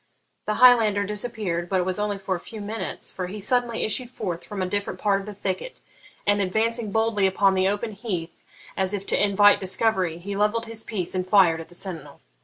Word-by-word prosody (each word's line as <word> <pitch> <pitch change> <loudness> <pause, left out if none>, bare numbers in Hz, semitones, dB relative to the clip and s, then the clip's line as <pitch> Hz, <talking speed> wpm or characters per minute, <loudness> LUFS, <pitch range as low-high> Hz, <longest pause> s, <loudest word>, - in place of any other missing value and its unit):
The 215 - 0
Highlander 225 -5 +6
disappeared, 205 -5 -2
but 190 -2 +2
it - - -2
was 185 +1 -2
only 205 -1 -1
for 195 -1 -3
a 180 - -3
few 220 +5 -9
minutes, 210 +2 -4
for 180 -1 -4
he 205 +4 -7
suddenly 240 +2 +1
issued 240 +3 -1
forth 190 -9 -5
from 205 - -7
a 185 - 0
different 200 +2 -3
part 200 -2 +1
of 195 - -9
the 210 - -6
thicket, 195 - -4 0.5
and, 205 0 +3
advancing 220 +3 0
boldly 220 -2 +2
upon 195 +1 +3
the 190 0 +2
open 205 +3 -1
heath 185 -6 -5 0.3
as 190 +1 0
if 195 -1 -6
to - - +2
invite 205 0 +5
discovery, 190 -3 0
he 200 +4 -6
levelled 210 +3 +1
his 225 -1 -6
piece 195 -6 -4
and 185 0 -2
fired 180 -5 +5
at 165 - -12
the 175 - -12
sentinel. 165 -7 -7
200 Hz, 210 wpm, -24 LUFS, 185-220 Hz, 0.5 s, Highlander